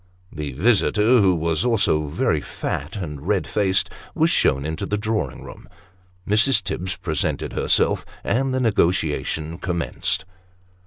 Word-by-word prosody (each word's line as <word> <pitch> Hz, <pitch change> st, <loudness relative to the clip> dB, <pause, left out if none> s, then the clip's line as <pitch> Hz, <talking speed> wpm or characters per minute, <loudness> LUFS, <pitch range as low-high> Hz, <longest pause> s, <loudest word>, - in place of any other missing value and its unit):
The 75 Hz, -3 st, -5 dB
visitor 110 Hz, -, +3 dB
(who 95 Hz, -2 st, +4 dB
was 80 Hz, +1 st, 0 dB, 0.2 s
very 75 Hz, -1 st, 0 dB
fat 75 Hz, +9 st, -5 dB
and 75 Hz, -8 st, -5 dB
red 100 Hz, -6 st, +1 dB
faced) 95 Hz, +2 st, +1 dB, 0.2 s
was -, -, +3 dB
shown 70 Hz, +1 st, +2 dB
into 80 Hz, +6 st, -3 dB
the 105 Hz, -, -1 dB
drawing 110 Hz, +1 st, -2 dB
room; -, -, -12 dB, 0.6 s
Mrs. 110 Hz, +6 st, +4 dB
Tibbs 95 Hz, +1 st, -2 dB
presented -, -, -2 dB
herself, -, -, +1 dB, 0.2 s
and 135 Hz, +2 st, 0 dB
the 130 Hz, -, 0 dB
negotiation 85 Hz, -, 0 dB
commenced. 90 Hz, 0 st, -2 dB
95 Hz, 125 wpm, -22 LUFS, 80-105 Hz, 0.6 s, who